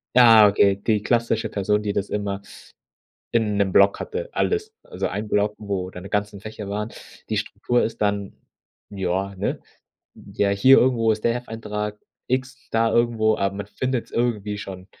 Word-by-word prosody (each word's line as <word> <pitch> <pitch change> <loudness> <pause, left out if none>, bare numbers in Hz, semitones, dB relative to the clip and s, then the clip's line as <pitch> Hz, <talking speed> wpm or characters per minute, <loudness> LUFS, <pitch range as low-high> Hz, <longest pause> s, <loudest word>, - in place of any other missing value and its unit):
Ja, 115 -4 +8
okay, 100 -1 +4
die 105 +1 0
klassische 115 -2 +1
Person, 105 0 0
die 105 -1 -1
das 100 - -2
immer 100 -1 -3 0.9
in 105 -3 +1
'nem 100 -2 +1
Block 100 +1 +5
hatte, - - -5
alles. 435 0 -1
Also - - -5
ein 105 +1 -4
Block, 105 0 +1
wo 95 -3 -3
deine 90 +2 -9
ganzen 105 0 -2
Fächer 105 0 -8
waren. 105 +2 -3 0.4
Die - - 0
Struktur 120 0 0
ist 115 0 -4
dann 100 -1 0 0.6
ja, 95 0 -2
ne? 100 - -2 0.6
Ja, 100 - -2
hier 130 +7 +6
irgendwo 115 -3 +3
ist 105 0 -1
der 115 - +3
Hefteintrag 105 -3 -5 0.3
X, 130 +1 -1
da 115 0 +2
irgendwo 115 -2 +2
aber 100 0 -1
man 100 -1 -5
findet's 125 +3 -3
irgendwie 105 -4 -1
schon. 95 -2 -8
105 Hz, 165 wpm, -23 LUFS, 100-115 Hz, 0.9 s, Ja